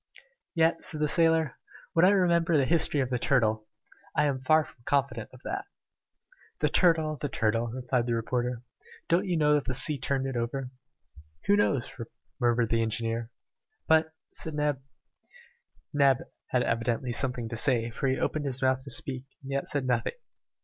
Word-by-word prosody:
"Yet," 165 Hz, 0 st, +2 dB
said 155 Hz, -, -7 dB
the 150 Hz, -, +2 dB
sailor, 160 Hz, -3 st, +2 dB, 0.3 s
"when 165 Hz, +2 st, +5 dB
I -, -, +7 dB
remember 170 Hz, -4 st, +3 dB
the 140 Hz, -, +3 dB
history 155 Hz, -2 st, +2 dB
of 130 Hz, -1 st, -2 dB
the 125 Hz, -, 0 dB
turtle, 110 Hz, -5 st, +1 dB, 0.5 s
I 150 Hz, -, +3 dB
am 135 Hz, -3 st, -1 dB
far 155 Hz, +4 st, +4 dB
from -, -, -17 dB
confident 140 Hz, +1 st, 0 dB
of 130 Hz, -, -15 dB
that." 390 Hz, +1 st, -4 dB, 0.9 s
"The -, -, +2 dB
turtle! 160 Hz, -4 st, +3 dB
the 145 Hz, -, -3 dB
turtle!" 115 Hz, -1 st, 0 dB
replied 125 Hz, 0 st, -1 dB
the 120 Hz, -, +1 dB
reporter. 120 Hz, +1 st, -2 dB, 0.5 s
"Don't 180 Hz, +4 st, +2 dB
you 175 Hz, -2 st, +1 dB
know 150 Hz, -1 st, +4 dB
that 145 Hz, -4 st, +1 dB
the 130 Hz, -, -1 dB
sea 140 Hz, +2 st, 0 dB
turned 135 Hz, +1 st, -1 dB
it 135 Hz, -1 st, -3 dB
over?" 125 Hz, +2 st, -3 dB, 0.7 s
"Who 205 Hz, -, +5 dB
knows?" 145 Hz, -11 st, +1 dB, 0.5 s
murmured 120 Hz, -2 st, +2 dB
the 115 Hz, 0 st, +2 dB
engineer. 115 Hz, +1 st, -1 dB, 0.6 s
"But 160 Hz, 0 st, +4 dB
" -, -, -47 dB
said 160 Hz, -2 st, -4 dB
Neb. 150 Hz, -2 st, 0 dB, 1.1 s
Neb 140 Hz, -3 st, +4 dB, 0.3 s
had 125 Hz, -1 st, +1 dB
evidently 115 Hz, +2 st, -1 dB
something 125 Hz, -2 st, 0 dB
to 120 Hz, -, -4 dB
say, 115 Hz, -1 st, +1 dB
for 135 Hz, -, -2 dB
he 130 Hz, 0 st, +1 dB
opened 155 Hz, -1 st, -1 dB
his 130 Hz, -2 st, -2 dB
mouth 130 Hz, 0 st, +2 dB
to -, -, -8 dB
speak 130 Hz, -1 st, -1 dB, 0.2 s
and 135 Hz, -, -7 dB
yet 140 Hz, 0 st, -1 dB
said 140 Hz, -3 st, -2 dB
nothing. 125 Hz, -2 st, 0 dB
135 Hz, 175 wpm, -28 LUFS, 120-155 Hz, 1.1 s, I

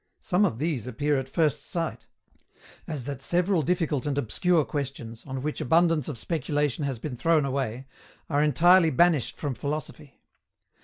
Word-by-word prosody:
Some 190 Hz, +3 st, +2 dB
of 160 Hz, -, -1 dB
these 145 Hz, -5 st, -2 dB
appear 145 Hz, +4 st, 0 dB
at 135 Hz, 0 st, -6 dB
first 155 Hz, -2 st, +1 dB
sight 165 Hz, -3 st, -4 dB, 0.8 s
as 150 Hz, -6 st, -4 dB
that 140 Hz, 0 st, -6 dB
several 175 Hz, +4 st, +1 dB
difficult 155 Hz, -3 st, 0 dB
and 140 Hz, -1 st, -1 dB
obscure 155 Hz, -, +1 dB
questions, 130 Hz, -6 st, -5 dB
on 130 Hz, -1 st, -5 dB
which 150 Hz, 0 st, -3 dB
abundance 165 Hz, 0 st, +3 dB
of 145 Hz, -, -5 dB
speculation 145 Hz, -1 st, -1 dB
has 135 Hz, -3 st, -2 dB
been 125 Hz, +3 st, -5 dB
thrown 160 Hz, +3 st, +2 dB
away, 130 Hz, -2 st, -3 dB, 0.4 s
are 145 Hz, -2 st, +1 dB
entirely 165 Hz, +4 st, +5 dB
banished 155 Hz, -2 st, +2 dB
from 145 Hz, -3 st, -3 dB
philosophy. 145 Hz, +1 st, -6 dB
145 Hz, 155 wpm, -26 LUFS, 135-165 Hz, 0.8 s, entirely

